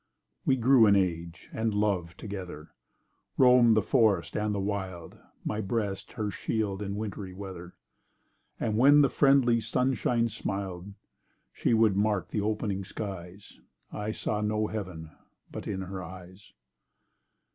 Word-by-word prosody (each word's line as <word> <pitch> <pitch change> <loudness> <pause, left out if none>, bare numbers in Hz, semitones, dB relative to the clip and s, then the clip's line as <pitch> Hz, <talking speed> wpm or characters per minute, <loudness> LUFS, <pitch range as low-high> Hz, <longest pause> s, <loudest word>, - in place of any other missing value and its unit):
We 130 - +5
grew 125 -1 +6
in 100 - +6
age—and 90 +4 -2
love—together, 95 -4 -3 0.7
Roaming 125 -3 +6
the 110 - +3
forest, 110 -8 +2
and 105 0 0
the - - -1
wild; 95 -4 -4 0.3
My 105 0 -1
breast 100 -2 -3
her 105 -4 -3
shield 105 -3 -2
in 100 -1 -3
wintry 105 -3 -5
weather— 95 -3 -8 0.8
And, 110 0 0
when 145 +3 +7
the 140 -3 +3
friendly 135 -4 +4
sunshine 120 0 +1
smil'd, 95 -5 -4
And 100 0 -11 0.6
she 115 - +1
would 110 -3 +4
mark 105 -1 0
the 105 - -1
opening 105 -2 -1
skies, 95 -1 -8 0.3
I 105 0 -4
saw 105 -1 -2
no 105 0 0
Heaven—but 95 -7 -8
in 95 -2 -3
her 95 0 -6
eyes. 90 +2 -11
105 Hz, 130 wpm, -28 LUFS, 95-110 Hz, 0.8 s, when